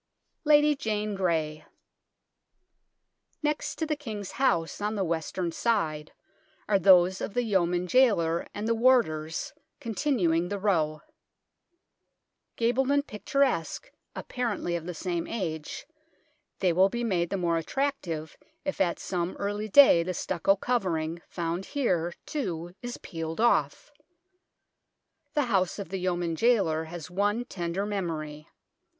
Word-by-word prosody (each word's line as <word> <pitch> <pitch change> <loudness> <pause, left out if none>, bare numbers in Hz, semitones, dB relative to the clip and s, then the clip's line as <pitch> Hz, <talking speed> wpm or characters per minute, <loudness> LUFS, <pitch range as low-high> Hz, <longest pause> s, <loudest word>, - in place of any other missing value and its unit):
LADY 295 0 +5
JANE 215 -5 -2
GREY 160 -5 -1 1.8
Next 300 0 -1
to 320 - -2
the 305 -1 -1
King's 215 -9 -6
House, 175 -10 0
on 210 +1 -1
the 200 - 0
western 170 +1 -2
side, 160 -9 -1 0.6
are 200 -2 +3
those 185 0 +5
of 205 - -4
the 245 - +2
Yeoman 180 -5 +1
Jailer 180 -7 +3
and 210 +2 -4
the 230 - +3
warders, 225 -11 +2 0.3
continuing 210 - 0
the 205 - -2
row. 160 -7 0 1.5
Gabled 245 +3 +1
and 285 0 +2
picturesque, 260 - -1 0.2
apparently 225 -8 -2
of 170 0 -5
the 180 - -5
same 175 -1 -2
age, 160 -9 -4 0.8
they 180 -3 +3
will 190 +3 +5
be 240 +3 -3
made 175 -7 0
the 195 - -1
more 170 -2 +1
attractive 170 - -3 0.3
if 285 -8 -2
at 175 -3 +2
some 175 0 -3
early 205 +1 -3
day 240 -7 +8
the 180 +2 -3
stucco 185 +3 +1
covering, 170 -8 -1
found 170 +2 -3
here, 175 - +1
too, 175 - -4
is 245 0 -5
peeled 165 +1 -6
off. 220 - +2 1.4
The 295 - +3
house 190 -6 +1
of 200 -4 -6
the 190 +1 -3
Yeoman 175 -2 -1
Jailer 165 -7 +2
has 170 +1 -8
one 205 +5 0
tender 175 0 -3
memory. 155 -7 -4
190 Hz, 130 wpm, -28 LUFS, 170-230 Hz, 1.8 s, day